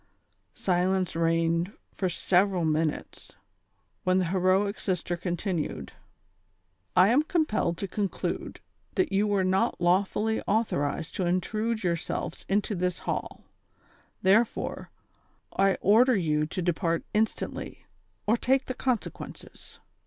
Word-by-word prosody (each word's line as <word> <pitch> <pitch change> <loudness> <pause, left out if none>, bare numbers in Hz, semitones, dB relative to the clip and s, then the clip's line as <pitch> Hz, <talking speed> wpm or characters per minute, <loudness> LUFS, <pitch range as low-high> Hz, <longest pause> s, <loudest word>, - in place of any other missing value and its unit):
Silence 185 0 +1
i - - -2
eigned 165 +2 +1 0.2
for 185 - -1
several 180 0 +2
minutes, 155 0 -2 0.7
when 185 0 +3
the 185 - +2
heroic 190 +3 +1
sister 180 -2 -1
continued: 175 - -3 1.0
"I 185 +2 +6
am 255 +6 +5
compelled 305 - 0
to 195 - -3
conclude 200 0 -3 0.3
that 370 - +1
yoTi 195 +1 +3
were 200 -2 +1
not 190 +6 +1
lawfully 200 +5 +1
authorized 165 -8 0
to 185 - 0
intrude 215 +5 -1
yourselves 170 -2 -3
into 205 +2 +1
this 180 -2 -1
hall; - - -4 0.8
therefore, 215 +5 +2 0.7
I 195 0 +3
order 235 +6 +5
you 155 -5 +1
to 180 +3 -4
depart 170 -1 0
instantly, 220 +1 -2 0.4
or 225 +3 +3
take 265 +3 +2
the 255 - -3
consequences." 250 -3 -4
185 Hz, 115 wpm, -28 LUFS, 175-210 Hz, 1.0 s, I